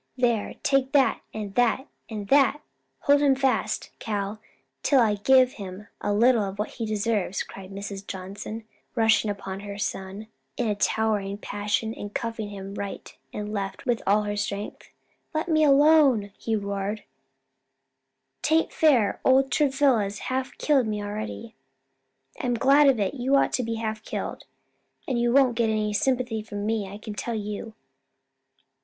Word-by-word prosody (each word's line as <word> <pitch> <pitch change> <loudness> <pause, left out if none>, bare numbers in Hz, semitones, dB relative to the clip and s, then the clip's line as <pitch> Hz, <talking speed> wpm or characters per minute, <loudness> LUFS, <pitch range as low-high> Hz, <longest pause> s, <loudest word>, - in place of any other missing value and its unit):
There, 235 -4 +1
take 275 0 +2
that, 275 -2 +3
and 210 -2 -6
that 245 +4 +2 0.2
and 210 -3 -5
that! 280 0 +4 0.4
Hold 285 0 +4
him 280 -2 +4
fast, 265 -1 0
Cal, 205 0 -3 0.4
till 275 - +4
I 220 -3 +4
give 255 +5 +4
him 195 -1 -9
a - - -1
little 230 +3 +4
of 195 0 -5
what 210 - -2
he 225 - -4
deserves," 210 -3 -1
cried 190 -1 -11
Mrs. 200 0 -7
Johnson, 200 +4 -6 0.3
rushing 225 -2 +3
upon 195 -1 -5
her 200 0 -7
son, 200 0 -4 0.3
in 240 - 0
a 210 - +2
towering 205 -1 0
passion, 210 +2 -2
and 205 -2 -8
cuffing 225 -2 -3
him 195 -1 -7
right 200 -1 -6 0.2
and 210 0 -5
left 195 -2 -4
with 240 -2 +1
all 210 +2 +4
her 205 0 -2
strength. 205 0 -4 0.5
"Let 315 +3 0
me 310 -2 +3
alone!" 280 -7 +5
he 225 - -2
roared; 200 0 -3 1.4
"'taint 320 +1 +2
fair; 250 -11 +3
old 265 0 +4
Travilla's 265 -8 +2 0.2
half 260 0 -3
killed 275 -6 +2
me 210 -1 -2
already." 215 +2 -5 0.9
"I'm 250 -6 0
glad 275 +4 +5
of 255 -4 +2
it! 200 +2 0
You 265 0 +1
ought 275 - +3
to - - +1
be 230 -1 -2
half 220 -1 -3
killed, - - -5 0.6
and 255 -3 0
you 240 0 +2
won't 260 -1 +5
get 230 -1 +2
any 215 -1 0
sympathy 245 -1 0
from 205 -1 -6
me, 215 -2 -1
I 205 - -7
can 215 0 -7
tell 230 +2 -3
you." 210 +1 -5
220 Hz, 160 wpm, -26 LUFS, 205-255 Hz, 1.4 s, alone